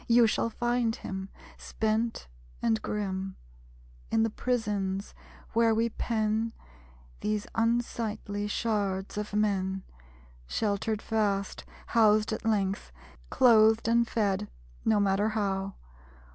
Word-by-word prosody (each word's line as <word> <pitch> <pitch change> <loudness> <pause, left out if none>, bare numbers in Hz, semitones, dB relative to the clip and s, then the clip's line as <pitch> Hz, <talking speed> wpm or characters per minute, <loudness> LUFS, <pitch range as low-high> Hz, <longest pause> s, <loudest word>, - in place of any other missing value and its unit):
You 235 0 +6
shall 225 +1 +1
find 240 0 0
him, 190 0 -6 0.3
spent 220 - -1 0.3
and 225 -2 +1
grim; 190 -2 -3 0.7
In 225 - +3
the 225 - 0
prisons, 205 -6 -1 0.4
where 230 -1 +4
we 230 +1 +2
pen 220 0 -1 0.7
These 210 -1 -1
unsightly 225 -3 -1
shards 205 -3 -1
of 210 - -4
men. 195 -2 0 0.6
Sheltered 210 - -1
fast; 205 -3 -1 0.2
Housed 215 -1 +4
at - - -4
length; 200 - 0 0.4
Clothed 225 -2 +5
and 235 0 +3
fed, 200 - 0 0.3
no 220 -2 +3
matter 200 +1 +2
how! 195 -3 -1
215 Hz, 105 wpm, -29 LUFS, 200-225 Hz, 0.7 s, You